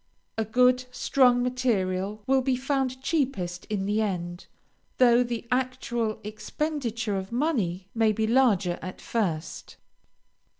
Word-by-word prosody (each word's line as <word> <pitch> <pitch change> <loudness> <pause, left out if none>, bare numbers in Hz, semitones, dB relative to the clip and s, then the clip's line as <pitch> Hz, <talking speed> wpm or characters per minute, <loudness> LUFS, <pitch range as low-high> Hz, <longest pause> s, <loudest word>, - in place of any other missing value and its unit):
A 225 - 0
good, 250 +3 +3
strong 250 -1 +3
material 210 -5 -1
will 265 0 +3
be 260 0 +1
found 265 0 -1
cheapest 205 - -1
in 200 -2 -2
the 210 +2 +1
end, 175 -4 -3 0.5
though 245 -1 +6
the 235 -1 -3
actual 250 -3 -1
expenditure 230 0 -3
of 190 +2 -5
money 225 - -1
may 225 -1 +3
be 220 +1 0
larger 220 -7 +2
at 185 - -7
first. 175 -8 -3
230 Hz, 125 wpm, -27 LUFS, 200-255 Hz, 0.5 s, though